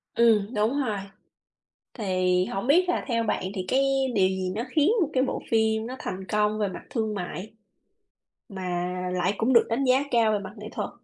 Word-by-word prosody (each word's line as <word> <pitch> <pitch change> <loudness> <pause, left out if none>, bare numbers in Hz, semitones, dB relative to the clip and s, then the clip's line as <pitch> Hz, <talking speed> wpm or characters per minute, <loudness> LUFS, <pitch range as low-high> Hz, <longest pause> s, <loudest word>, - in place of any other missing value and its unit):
Ừm, 225 -2 +3
đúng 225 +6 +1
rồi. 215 -6 -1 1.0
Thì 185 -4 +1
hổng 195 +4 -4
biết 350 +7 +4
là 360 - 0
theo 230 -2 +1
bạn 210 - -1
thì 185 -3 -3
cái 260 - +3 0.3
điều 190 -3 +4
gì 190 -1 -2
nó 220 - -2
khiến 300 +6 +3
một 320 - +1
cái 255 - +2
bộ 265 - -2
phim 220 0 +2
nó 255 +2 -6
thành 190 +1 -5
công 210 0 +1
về 210 -2 +1
mặt 185 - -8
thương 220 -3 -1
mại, 190 +2 -6 1.0
mà 180 -2 -3 0.2
lại 180 +2 +1
cũng 235 +4 +2
được 235 - +6
đánh 235 +4 0
giá 260 +1 +3
cao 230 -2 +4
về 210 - +1
mặt 195 0 -8
nghệ 210 +1 -8
thuật? - - -3
215 Hz, 200 wpm, -26 LUFS, 190-235 Hz, 1.0 s, được